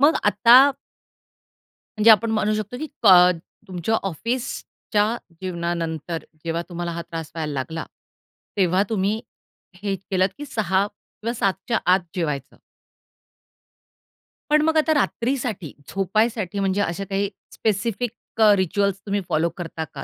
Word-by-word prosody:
मग 290 +3 +6
आता 205 +3 +5 1.4
म्हणजे 220 +1 +7
आपण 220 +1 +4
म्हणू 215 -1 +1
शकतो, 215 +3 -3
की 310 +4 -4 0.2
क - - +6 0.6
तुमच्या 185 +4 -1
ऑफिसच्या 225 - -2 0.3
जीवनानंतर 170 -2 -3 0.2
जेव्हा 165 0 -1
तुम्हाला 175 0 -4
हा 170 0 -4
त्रास 165 -2 -7
व्हायला 155 -2 -3
लागला 155 +4 -4 0.7
तेव्हा 185 0 +3
तुम्ही 210 0 0 0.6
हे 200 -1 0
केलंत, 190 0 0
की 290 - -6
6:00 200 -7 +1
किंवा 220 +2 -7
7:00च्या 200 +1 0
आत 190 - +4 0.2
जेवायचं. 150 -7 -3 1.9
पण 300 0 +5
मग 320 +1 +2
आता 315 0 +3
रात्रीसाठी 240 - -1 0.2
झोपायसाठी 205 0 0
म्हणजे 195 +1 +1
अशा 175 +1 -2
काही 200 0 0 0.2
स्पेसिफिक 220 +2 -1 0.3
अ, 215 -1 +8
रिच्युअल्स 195 +1 0
तुम्ही 200 0 -1
फॉलो 165 +2 +2
करता 165 -2 -5
का? 135 - -6
195 Hz, 125 wpm, -23 LUFS, 170-220 Hz, 1.9 s, अ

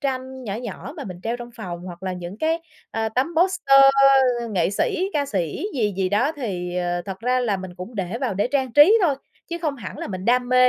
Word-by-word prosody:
tranh 260 -1 -3
nhỏ 200 -3 -3
nhỏ 235 +3 -6
mà 290 - -6
mình 180 -4 -8
treo 230 +2 -2
trong 240 0 -9
phòng, 180 -7 -6
hoặc 175 -1 -9
là 190 -1 -2
những 180 +2 -7
cái, 325 +3 +1 0.3
à, 225 0 -1
tấm 255 +7 0
poster 320 -6 +5 0.7
nghệ 180 -4 +1
sĩ, 365 - 0
ca 285 -2 0
sĩ 185 - -2
gì 215 -6 +1
gì 190 -1 +1
đó 230 +10 +2
thì, 180 -9 -4
ờ, 175 0 -1
thật 190 +1 -6
ra 250 +2 +1
là 220 -5 0
mình 185 -1 -8
cũng 185 +7 -8
để 195 +2 -3
vào 255 -7 -1
để 205 +5 0
trang 265 -2 0
trí 325 - +7
thôi, 315 -6 +3 0.3
chứ 340 0 -4
không 310 -4 -2
hẳn 205 -7 -8
là - - -5
mình 185 -2 -5
đam 245 +2 +2
mê 255 0 +6
230 Hz, 235 wpm, -23 LUFS, 185-275 Hz, 0.7 s, trí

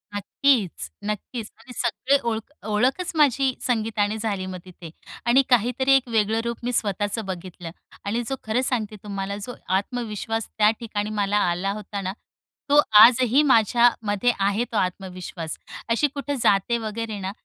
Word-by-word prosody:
नक्कीच, 210 - 0 0.2
नक्कीच. 210 +2 -4
आणि 250 +2 -13
सगळी 255 +3 +1
ओळख 225 +3 -4 0.2
ओळखच 250 - +1
माझी 275 -3 +3
संगीतानेच 220 -3 0
झाली 200 -4 -2
मग 185 -1 -6
तिथे. 180 -2 -11 0.4
आणि 240 +3 +5
काहीतरी 250 +3 +2
एक 260 -2 +2
वेगळं 220 0 +1
रूप 235 -1 -3
मी 245 - -1
स्वतःचं 205 +1 -1
बघितलं. 180 -2 -7 0.3
आणि 225 +4 -1
जो 270 - -1
खरं 220 +4 0
सांगते 215 -3 -2
तुम्हाला, 200 -1 -4
जो 245 +4 -7 0.2
आत्मविश्वास 225 0 -3
त्या 210 0 +5
ठिकाणी 210 -3 -3
मला 200 +1 +1
आला 185 +3 -1
होता 205 -1 -5
ना, 190 0 -3 0.6
तो 295 +1 +7 0.2
आजही 250 +3 +5
माझ्यामध्ये 235 -3 +3
आहे 200 +3 +1
तो 220 - -1
आत्मविश्वास. 180 -3 -4 0.3
अशी 235 +6 +3
कुठं 285 0 -3
जाते 200 +4 +3
वगैरे 220 -1 -4
ना, 190 0 -4
220 Hz, 150 wpm, -24 LUFS, 200-245 Hz, 0.6 s, तो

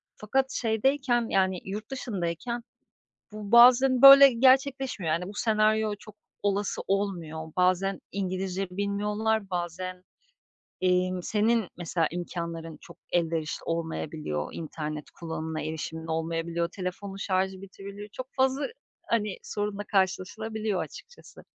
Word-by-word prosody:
fakat 265 +5 0
şeydeyken, 240 +1 +1
yani, 190 -2 +1
yurt 210 +5 -6
dışındayken 235 -1 -3 0.7
bu 210 -1 -7
bazen, 250 +2 +7
böyle, 275 -1 +11
gerçekleşmiyor. 260 - +2
Hani, 170 +2 -1
bu - - -8
senaryo 215 0 +2
çok 215 - -13 0.3
olası 205 0 0
olmuyor. 170 -6 -2
Bazen 185 +1 +2
İngilizce 190 0 -2
bilmiyorlar, 205 +2 -1
bazen, 180 +1 -4 0.8
emm, 185 0 +1
senin 220 +1 +1
mesela 170 -2 0
imkânların 170 -2 -5
çok - - -14
elverişli 165 -2 -1
olmayabiliyor, 160 - -3
internet 155 -2 -5
kullanımına 160 -1 -4
erişimin 160 +1 -5
olmayabiliyor, 165 +1 -2
telefonun 190 +2 -5
şarjı 190 -1 -1
bitirebiliyor, 200 +1 -9
çok 255 +5 -7
fazla, 265 +1 +1 0.4
hani, 210 -4 0
sorunla 205 -1 -3
karşılaşılabiliyor 205 +2 -1
açıkçası. 485 - -13
195 Hz, 110 wpm, -27 LUFS, 170-220 Hz, 0.8 s, böyle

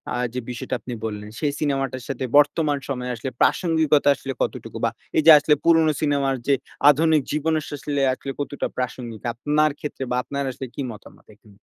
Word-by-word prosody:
আ - - -1 0.2
যে 125 - -2
বিষয়টা 120 0 -4
আপনি 125 +3 -7
বললেন, 105 -1 -5
সেই 145 -2 0
সিনেমাটার 135 -3 -1
সাথে 135 -1 -3
বর্তমান 145 0 +3
সময়ে 125 -2 -3
আসলে 125 +4 -5
প্রাসঙ্গিকতা 160 -4 +3
আসলে 135 0 -6
কতটুকু - - -3
বা, - - +2 0.3
এইযে 160 +1 +7
আসলে 150 0 +3
পুরনো 165 -2 +5
সিনেমার 140 -2 +1
যে 140 - +4 0.4
আধুনিক 155 +1 +4
জীবনে 155 +1 +1
আস - - -9
আসলে 145 0 -2
আসলে 135 +1 -6
কতটা 145 0 -3
প্রাসঙ্গিক 120 -3 -5
আপনার 150 +4 +1
ক্ষেত্রে? 145 -2 -5
বা, - - +1
আপনার 140 0 -3
আসলে 130 - -7
কি - - -4
মতামত 105 - -14
এখানে? 105 -2 -21
140 Hz, 180 wpm, -23 LUFS, 125-150 Hz, 0.4 s, এইযে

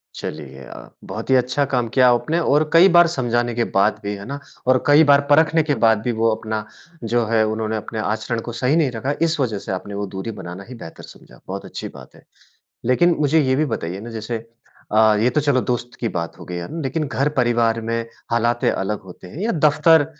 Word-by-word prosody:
चलिए, 70 -3 -7
अ, - - -11
बहुत - - -7
ही 130 - +5
अच्छा 130 +3 +1
काम 125 -2 +1
किया 125 -2 +6
आपने 155 +7 0
और 155 -2 +2
कई 170 +3 +8
बार 175 0 +7
समझाने 120 -3 0
के 120 - +1
बाद 100 +2 +2
भी 100 - -3
है 100 - -9
ना 140 +3 -6 0.3
और 130 0 +3
कई 145 +2 +7
बार 140 0 +6
परखने 160 +2 +4
के 145 -2 0
बाद 110 -2 +4
भी 120 - -1
वो 115 - +4
अपना 110 -1 -4 0.5
जो 120 -1 +2
है 110 0 +2
उन्होंने 110 0 -2
अपने 110 +1 -6
आचरण 110 +2 -2
को - - -4
सही 130 +4 +2
नहीं 155 -6 +2
रखा, 125 +4 -2
इस 165 -1 +1
वज़ह 115 -6 0
से - - -7
आपने 95 +2 -5
वो 100 0 -3
दूरी 105 +4 -4
बनाना 90 +3 -8
ही 130 - -8
बेहतर 80 -8 -11
समझा, - - -15
बहुत - - -6
अच्छी - - -7
बात - - -14
है। - - -19 0.6
लेकिन 165 +8 +3
मुझे 150 +2 +3
ये 130 -2 +1
भी 155 +3 +1
बताइए 90 0 -5
ना 120 - -8
जैसे 115 0 -5 0.5
अ, 110 0 +5
ये 115 +3 +3
तो 140 +4 0
चलो 140 -3 +2
दोस्त 120 0 -2
की 120 - -1
बात 85 -2 -4
हो - - -10
गयी 90 - -5
है, 85 - -4
है - - -9
ना? 165 - -4
लेकिन 140 +4 -2
घर-परिवार 120 -3 +1
में 115 0 -1 0.3
हालातें 120 +1 +1
अलग 100 +2 -3
होते 90 -1 -13
हैं 140 - -11
या 230 - +1
दफ़्तर 155 +1 +5
120 Hz, 230 wpm, -21 LUFS, 110-145 Hz, 0.6 s, कई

